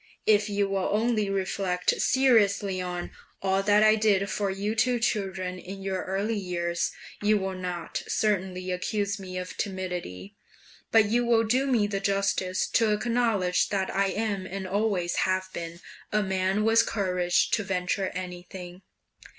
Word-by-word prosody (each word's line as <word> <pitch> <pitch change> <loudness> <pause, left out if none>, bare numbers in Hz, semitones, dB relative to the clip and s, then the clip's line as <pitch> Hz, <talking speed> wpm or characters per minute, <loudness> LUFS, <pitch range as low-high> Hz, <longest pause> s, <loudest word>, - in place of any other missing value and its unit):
If 210 0 +4
you 200 -1 +1
will 195 -1 -1
only 215 -1 +1
reflect 190 -2 0
seriously 205 -7 +3
on 180 -1 -4 0.3
all 195 0 +1
that 205 +1 +4
I 215 0 +7
did 205 -3 +2
for 200 -1 -1
you 200 +3 -2
two 245 +2 +2
children 190 -5 -2
in 195 +2 -8
your 190 -1 -2
early 205 +3 -1
years, 170 -2 -2 0.3
you 210 +1 +3
will 190 -1 -2
not 180 -2 -4
certainly 185 -3 -1
accuse 200 +3 -1
me 185 -1 -7
of 180 0 -5
timidity, 180 - -4 0.6
but 220 -1 +6
you 235 +4 +1
will 235 -1 +3
do 255 +5 +1
me 235 -6 +3
the 200 -1 -2
justice 195 -2 0
to 225 -2 +3
acknowledge 215 -5 +1
that 190 -2 -1
I 200 0 +3
am, 200 -2 -2
and 190 0 -5
always 195 -3 0
have 185 0 0
been, 170 +1 -6 0.3
a 210 0 +2
man 190 +1 0
with 225 +1 +4
courage 180 -4 +1
to 215 - +1
venture 185 0 -1
anything. 180 0 -7
195 Hz, 155 wpm, -27 LUFS, 185-210 Hz, 0.6 s, I